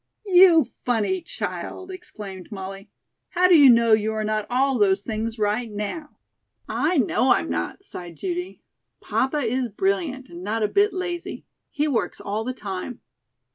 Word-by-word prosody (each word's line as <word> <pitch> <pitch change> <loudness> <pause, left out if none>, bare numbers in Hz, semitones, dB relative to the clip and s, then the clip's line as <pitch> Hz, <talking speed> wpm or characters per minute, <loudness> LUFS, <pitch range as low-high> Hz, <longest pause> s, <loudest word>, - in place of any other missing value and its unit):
"You 360 -4 +7 0.2
funny 245 - 0
child," 370 +2 -6
exclaimed 205 - -9
Molly; 195 0 -7 0.4
"how 365 0 +3
do 365 - +6
you 285 -4 +8
know 230 -2 +5
you 215 0 +2
are 215 0 -2
not 215 -1 -1
all 260 0 +1
those 200 -1 +3
things 225 +1 -3
right 215 +2 -1
now?" 210 +10 -5 0.5
"I 330 +3 0
know 250 0 +3
I'm - - -1
not," 390 - -3
sighed 175 - -9
Judy. 360 0 -4 0.4
"Papa 265 +4 -1
is 250 +1 0
brilliant, 275 - -1
and 175 -2 -10
not 215 +3 -1
a - - +3
bit 405 - +3
lazy. 360 -2 -5 0.2
He 295 +1 -1
works 260 -6 -1
all 210 +2 -3
the 255 - -3
time." 205 0 -6
240 Hz, 160 wpm, -24 LUFS, 210-335 Hz, 0.5 s, you